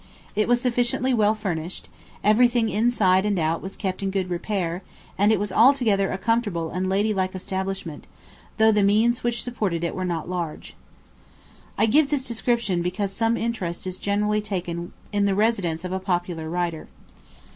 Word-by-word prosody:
It 215 +1 +1
was 245 0 +3
sufficiently 245 +1 +1
well 215 -2 +3
furnished; 180 -5 -4 0.4
everything 230 +2 +4
inside 210 -5 +3
and 205 -2 0
out 165 0 0
was 190 - -7
kept 190 -2 -3
in 195 - -1
good 190 -2 -2
repair, 175 -1 -2 0.3
and 205 +2 +3
it 215 - +3
was 205 -1 -2
altogether 225 -4 +4
a - - -2
comfortable 200 -6 0
and 185 +1 -2
ladylike 195 -1 0
establishment, 190 -4 -4 0.5
though 220 0 +5
the 210 -1 +3
means 220 +5 +3
which 235 -1 -1
supported 210 -9 -2
it 170 - -1
were 185 - -3
not 170 -3 -2
large. 175 -3 -5 1.0
I - - +4
give 285 +6 +4
this 285 -3 0
description 235 -6 0
because 190 +3 -2
some 225 +3 +1
interest 195 -8 -3
is 185 0 -5
generally 210 +1 +1
taken 175 -4 -4 0.2
in 205 -1 +2
the 195 -1 +2
residence 190 -6 0
of 180 - -4
a 190 - -1
popular 175 -4 -2
writer. 170 -2 -2
200 Hz, 170 wpm, -24 LUFS, 180-225 Hz, 1.0 s, though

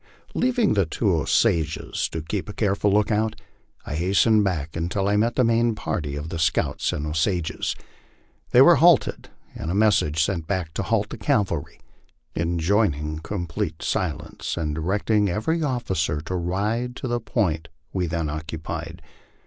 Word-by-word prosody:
Leaving 245 -3 +2
the 100 -5 +2
two 95 +4 +1
Osages 80 0 +1
to 80 - -5
keep 95 +5 -3
a - - -5
careful 100 -1 +1
lookout, 105 +1 +1 0.5
I - - -5
hastened 100 +6 +3
back 85 -5 -2
until 90 +4 -1
I 100 - +2
met 115 +3 +2
the 130 - +3
main 115 0 +2
party 75 -8 -3
of 75 +2 -5
the 85 -1 -4
scouts 80 -1 +1
and 75 - -3
Osages. 80 +2 -1 0.7
They - - +7
were - - +7
halted - - +4 0.2
and 80 - -5
a 90 - -1
mes 105 0 +5
sage 75 +2 +1
sent 85 -3 -2
back 90 -5 -2
to - - -2
halt - - 0
the - - -7
cavahy, 90 -7 -1 0.5
enjoining 85 -2 0
complete 85 -1 -4
silence, 80 -2 -3
and 75 -3 -1
directing 100 +6 +1
every 135 - 0
officer 95 - -1
to 80 - -6
ride 105 +8 -1
to 130 - -5
the 120 0 0
point 90 -9 -1 0.3
we 90 -2 0
then 85 -1 -2
occupied. 80 +2 -5
90 Hz, 155 wpm, -24 LUFS, 80-105 Hz, 0.7 s, They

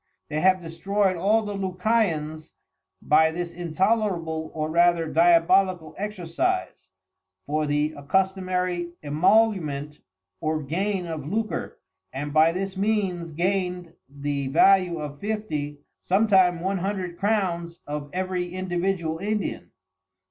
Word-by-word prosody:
They 150 0 -1
have 185 +1 +3
destroy'd 190 +4 0
all 210 +6 +2
the 205 -1 -4
Lucayans 180 -5 -1 0.5
by 160 +1 +5
this 170 +1 -4
intolerable 175 -2 -1
or 155 -1 -1
rather 170 0 +4
Diabolical 170 +1 +3
exercise, 210 - -2 0.6
for 150 +1 -1
the 150 +1 0
accustomary 180 +2 -1
emolument 155 -3 +1 0.4
or 155 0 -1
gain 185 +6 -1
of 160 -4 -5
lucre, 215 +5 -3 0.3
and 145 +2 -5
by 155 +1 +5
this 190 +2 -4
means 195 -4 0
gain'd 180 0 -2 0.2
the 140 0 -3
value 180 +4 +4
of 145 -2 -6
fifty, 155 -9 -3 0.2
sometime 190 -3 +3
one 190 +1 -1
hundred 185 -2 -3
Crowns 180 -5 -1
of 145 0 -5
every 180 -1 -2
individual 175 -3 -1
Indian. 210 +2 -3
175 Hz, 110 wpm, -25 LUFS, 155-195 Hz, 0.6 s, by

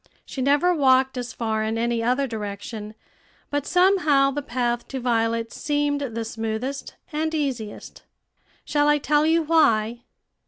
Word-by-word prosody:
She 265 - -6
never 290 +7 +3
walked 265 -3 +3
as 245 -2 -4
far 220 -2 -2
in 220 +1 -1
any 235 0 0
other 250 +4 +1
direction; 210 -1 -6 0.6
but 290 -1 -1
some 380 +2 +4
how 275 -4 +3
the 290 +2 -3
path 240 -2 -2
to 265 - -5
Violet's 230 -1 0
seemed 290 -1 0
the 230 -4 -3
smoothest 225 +4 -4 0.2
and 315 +1 -1
easiest. 255 -8 -4 0.6
Shall 290 0 +2
I 295 0 +4
tell 295 +1 +2
you 325 +1 +3
why? 240 -8 +2
260 Hz, 150 wpm, -24 LUFS, 230-290 Hz, 0.6 s, some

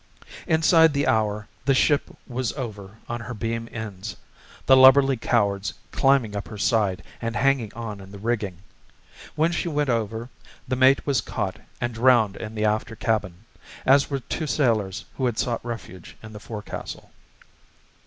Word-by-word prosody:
Inside 160 -1 +5
the 140 0 +1
hour 105 -1 0 0.2
the 135 - +3
ship 145 +2 +2 0.2
was 125 -1 -2
over 105 -6 -7
on 120 0 -3
her 125 +2 -6
beam 115 +2 -3
ends, 110 -2 -6 0.5
the 130 - +7
lubberly 135 +1 +7
cowards 100 -5 0 0.2
climbing 135 -6 +2
up 100 - -4
her 110 - -8
side 100 -4 +1 0.2
and 115 0 -3
hanging 135 -6 +1
on 110 -4 -6
in 95 0 -12
the 100 - -9
rigging. 105 -4 -2 0.8
When 160 +3 +2
she 175 - -2
went 150 -4 0
over, 115 +1 -2 0.4
the 130 - 0
mate 130 +2 +4
was 140 -3 +1
caught - - -3 0.2
and 120 0 -2
drowned 115 -3 +4
in 110 0 -7
the 110 0 0
after 110 +1 0
cabin, 110 -4 -2 0.4
as 135 +1 +5
were 140 -2 -2
two 155 +5 -4
sailors 110 - 0
who 130 - +1
had 120 -3 -2
sought 120 -2 -1
refuge 115 -7 -8
in 110 -1 -10
the 105 - -8
forecastle. 105 -1 -7
115 Hz, 165 wpm, -24 LUFS, 105-130 Hz, 0.8 s, the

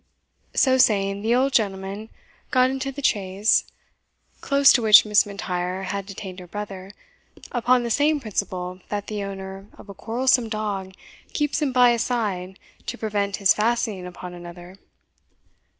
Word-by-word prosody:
So 260 -1 +3
saying, 200 -4 +2
the 225 +3 +2
old 265 +2 +1
gentleman 200 0 -1 0.4
got 255 -1 +3
into 270 +1 -3
the 280 +1 -8
chaise, 200 -1 +2 0.8
close 280 0 +5
to 245 - +3
which 215 -1 +8
Miss 210 -1 +3
M'Intyre 185 -2 -4
had 195 +1 -4
detained 190 -2 -8
her 180 - -11
brother, 195 -1 -7 0.6
upon 245 +1 +2
the 235 - -3
same 295 +4 +2
principle 185 -6 -4
that 205 -1 -3
the 210 -2 -4
owner 195 0 -7
of - - -14
a - - -7
quarrelsome 240 +2 +1
dog 200 -3 -4 0.4
keeps 295 +1 -1
him 290 -3 +1
by 250 -1 +5
his 235 -1 0
side 195 -7 -2 0.3
to 245 - -4
prevent 205 -3 -2
his 195 -2 +4
fastening 215 -4 -1
upon 180 0 -9
another. 175 +1 -11
205 Hz, 150 wpm, -23 LUFS, 190-240 Hz, 0.8 s, which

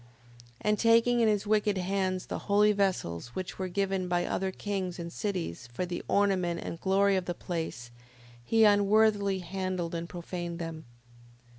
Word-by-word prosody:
5:16. 120 - -23 0.5
And 210 0 +1
taking 230 +1 +4
in 230 - +4
his 210 -1 +1
wicked 210 -1 +2
hands 185 0 -1
the - - -4
holy 210 +1 +5
vessels, 180 - -1
which 185 0 -5
were 190 - -1
given 190 0 -1
by 175 0 +1
other 190 0 -1
kings 190 -2 -3
and 170 -1 -6
cities, 180 - -4
for 150 +9 -2
the 175 0 -4
ornament 185 -4 +1
and 165 - -6
the - - -30
glory 195 +1 +3
of 185 -1 -1
the 175 - -3
place, 160 -11 -5 0.5
he 225 - +3
unworthily 205 -1 +4
handled 185 -1 -3
and 170 0 -4
profaned 175 -1 -5
them. 165 -2 -6
190 Hz, 170 wpm, -29 LUFS, 175-205 Hz, 0.5 s, holy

